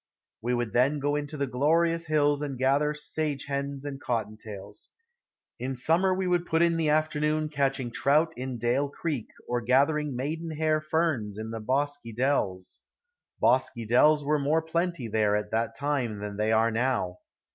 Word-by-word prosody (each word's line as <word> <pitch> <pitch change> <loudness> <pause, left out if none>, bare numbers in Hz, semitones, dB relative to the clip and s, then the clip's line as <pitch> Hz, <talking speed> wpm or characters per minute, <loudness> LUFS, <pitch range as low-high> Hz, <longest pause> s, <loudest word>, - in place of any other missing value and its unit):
We 120 +2 0
would 120 -3 -2
then 135 +5 +3
go 145 +1 0
into 150 +1 -4
the 140 - 0
glorious 165 +6 +1
hills 145 -1 +2
and 140 -3 -4
gather 140 +4 +2
sage 150 -2 -3
hens 140 0 -3
and 140 -1 -5
cotton 115 -3 -2
tails. 105 -2 -10 0.7
In 130 +2 -3
the - - -7
summer 170 +9 +3
we 185 0 0
would 175 -1 +1
put 160 +1 +3
in 170 -1 +2
the 160 -2 +1
afternoon 155 0 +1
catching 135 -4 -1
trout 150 +7 +2
in 130 0 -4
Dale 125 +5 +1
Creek 140 -5 -3 0.2
or 120 0 -1
gathering 140 +4 +2
maiden 155 +5 -4
hair 155 0 +1
ferns 155 -10 -1
in 110 +1 -5
the 115 - -4
bosky 140 0 -1
dells. 105 -8 -1 0.6
Bosky 125 -3 +2
dells 150 +6 +5
were 150 +1 +2
more 155 +3 +1
plenty 170 -5 -1
there 105 -1 +2
at 105 0 -2
that 115 +1 -1
time 140 -7 -1
than 105 0 -6
they 105 +1 0
are 110 +1 +3
now. 115 -6 -1
140 Hz, 175 wpm, -27 LUFS, 120-155 Hz, 0.7 s, dells